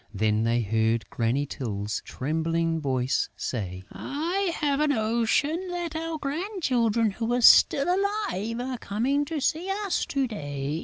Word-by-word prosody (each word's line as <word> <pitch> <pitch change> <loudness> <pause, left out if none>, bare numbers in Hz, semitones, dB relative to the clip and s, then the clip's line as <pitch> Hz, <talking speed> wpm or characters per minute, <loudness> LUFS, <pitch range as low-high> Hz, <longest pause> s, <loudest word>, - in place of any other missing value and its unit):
Then 110 +1 +1
they 115 +1 +2
heard 110 +2 +1
Granny 125 +5 0
Tyl's 105 -6 -4
trembling 165 +3 -1
voice 130 -2 0
say: 95 -6 -4
"I 345 +6 -2
have 285 -1 0
a 300 - +3
notion 255 +8 +1
that 350 -2 -4
our 325 0 -3
grandchildren 275 - 0
who 225 +4 -3
are 245 - +1
still 275 +4 +7
alive 370 - -1
are 250 0 -4
coming 260 +9 0
to 315 +1 -3
see 320 +6 -1 0.2
us 390 - 0
to 275 -1 0
day." 145 - -4
230 Hz, 145 wpm, -26 LUFS, -, 0.2 s, still